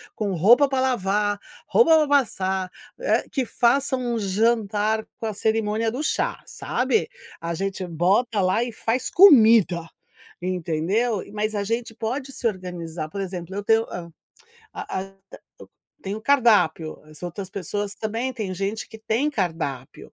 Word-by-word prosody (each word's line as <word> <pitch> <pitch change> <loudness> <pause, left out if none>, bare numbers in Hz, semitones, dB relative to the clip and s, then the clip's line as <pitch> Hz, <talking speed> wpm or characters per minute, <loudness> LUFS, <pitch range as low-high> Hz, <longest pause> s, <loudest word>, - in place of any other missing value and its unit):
com 205 -3 -2
roupa 240 - +5
pra 265 -1 0
lavar, 205 -4 0 0.3
roupa 325 -9 +5
pra 305 - +2
passar, 190 -9 0 0.3
eh, - - +1
que 265 - 0
faça 260 +3 +2
um 240 -2 -2
jantar 215 +1 +1 0.2
com 225 - -4
a 215 - -3
cerimônia 220 +1 0
do 270 +6 -4
chá, - - -1
sabe. 445 +1 -1 0.3
A 170 0 -3
gente 195 0 -3
bota 195 +7 +1
lá 185 +6 +2
e 240 - -4
faz 230 +3 -2
comida, 225 - +6 0.6
entendeu. 185 +5 -1
Mas 215 0 -2
a 200 - -1
gente 230 +1 -3
pode 260 +5 -4
se - - -8
organizar, 175 -5 -5
por 200 - -6
exemplo, 185 -1 -6
eu 205 - -3
tenho 225 +1 +3
a 170 -1 -7 0.7
a 190 - -4
a 195 +1 -8 0.9
eu - - -30
tenho 200 +2 -4
o - - -16
cardápio, 210 - +2
as 155 +2 -15
outras 185 +2 -6
pessoas 200 +2 -4
também, 230 +4 -3
tem 205 -6 -4
gente 200 +3 -3
que 220 - -11
tem 225 +7 0
cardápio 160 - -4
210 Hz, 155 wpm, -23 LUFS, 185-235 Hz, 0.9 s, comida